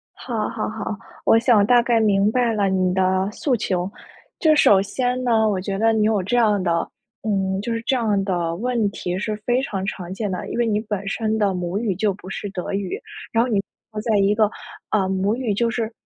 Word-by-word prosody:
好 225 Hz, -4 st, -3 dB
好 -, -, -3 dB
好， 215 Hz, -1 st, -4 dB, 0.3 s
我 225 Hz, -, +6 dB
想 225 Hz, -4 st, +4 dB
大 245 Hz, +1 st, +5 dB
概 235 Hz, -1 st, +2 dB
明 205 Hz, -1 st, +3 dB
白 240 Hz, -2 st, +1 dB
了 200 Hz, -2 st, +1 dB
你 185 Hz, -1 st, +1 dB
的 190 Hz, +1 st, +1 dB
诉 260 Hz, +4 st, 0 dB
求。 185 Hz, -4 st, -1 dB, 0.5 s
这 310 Hz, -2 st, +4 dB
首 200 Hz, -9 st, +6 dB
先 250 Hz, +5 st, -1 dB
呢， 225 Hz, -3 st, +3 dB
我 195 Hz, -3 st, 0 dB
觉 195 Hz, 0 st, -3 dB
得 225 Hz, +2 st, +3 dB
你 215 Hz, -1 st, +2 dB
有 215 Hz, -2 st, +2 dB
这 205 Hz, +7 st, 0 dB
样 210 Hz, -4 st, +3 dB
的 170 Hz, -2 st, 0 dB, 0.4 s
嗯， 195 Hz, -2 st, 0 dB
就 230 Hz, +3 st, -2 dB
是 230 Hz, -, -2 dB
这 265 Hz, -, +2 dB
样 215 Hz, -5 st, +1 dB
的 175 Hz, -3 st, -1 dB
问 235 Hz, -1 st, 0 dB
题 180 Hz, -2 st, -3 dB
是 210 Hz, +2 st, -2 dB
非 245 Hz, +1 st, +2 dB
常 195 Hz, -8 st, -3 dB
常 185 Hz, -2 st, -5 dB
见 205 Hz, 0 st, -3 dB
的。 180 Hz, -, -4 dB
因 -, -, -4 dB
为 240 Hz, -, +2 dB
你 210 Hz, -2 st, +1 dB
本 205 Hz, -3 st, -4 dB
身 220 Hz, +1 st, -1 dB
的 200 Hz, -3 st, +2 dB
母 180 Hz, +1 st, -3 dB
语 210 Hz, -4 st, -1 dB
就 205 Hz, +1 st, +1 dB
不 185 Hz, -1 st, -11 dB
是 205 Hz, -, -5 dB
德 185 Hz, -2 st, -5 dB
语， 200 Hz, -, -2 dB, 0.3 s
然 230 Hz, 0 st, +3 dB
后 250 Hz, -, -2 dB
你 205 Hz, -4 st, +2 dB, 0.3 s
能 210 Hz, -, -3 dB
在 220 Hz, -2 st, +1 dB
一 200 Hz, +1 st, +3 dB
个， 215 Hz, -1 st, +3 dB, 0.4 s
啊， 200 Hz, -3 st, +1 dB
母 190 Hz, +3 st, 0 dB
语 240 Hz, -4 st, -1 dB
就 230 Hz, +3 st, +1 dB
是 225 Hz, -1 st, -2 dB
210 Hz, 245 characters per minute, -22 LUFS, 190-230 Hz, 0.5 s, 我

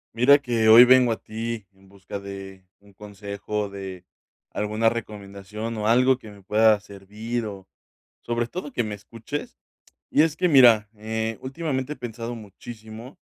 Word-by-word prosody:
Mira 135 Hz, +5 st, +6 dB
que 120 Hz, -5 st, 0 dB
hoy 115 Hz, +3 st, +10 dB
vengo 125 Hz, -1 st, +5 dB
a 110 Hz, -, -5 dB
ti 110 Hz, -1 st, -5 dB
en 95 Hz, 0 st, -23 dB
busca 100 Hz, 0 st, -8 dB
de 95 Hz, -1 st, -9 dB, 0.2 s
un 100 Hz, 0 st, -21 dB
consejo, 100 Hz, +1 st, -5 dB
de 95 Hz, -2 st, -8 dB, 0.5 s
alguna 105 Hz, +2 st, 0 dB
recomendación 105 Hz, 0 st, -6 dB
o 105 Hz, -1 st, -3 dB
algo 125 Hz, +3 st, +4 dB
que 110 Hz, -5 st, -12 dB
me 100 Hz, -1 st, -16 dB
pueda 110 Hz, +2 st, +3 dB
servir, 105 Hz, +4 st, -6 dB
o 95 Hz, -2 st, -9 dB, 0.5 s
sobre 120 Hz, 0 st, -2 dB
todo 150 Hz, -1 st, -7 dB
que -, -, 0 dB
me 105 Hz, -2 st, -5 dB
escuches, 115 Hz, +8 st, -7 dB, 0.5 s
y -, -, +4 dB
es 160 Hz, -1 st, +1 dB
que 180 Hz, -, +1 dB
mira, 120 Hz, -8 st, +6 dB
eh, 110 Hz, +1 st, -3 dB
últimamente 135 Hz, 0 st, -3 dB
he -, -, -20 dB
pensado 120 Hz, -1 st, -6 dB
muchísimo 110 Hz, +3 st, -11 dB
110 Hz, 160 wpm, -24 LUFS, 100-120 Hz, 0.5 s, hoy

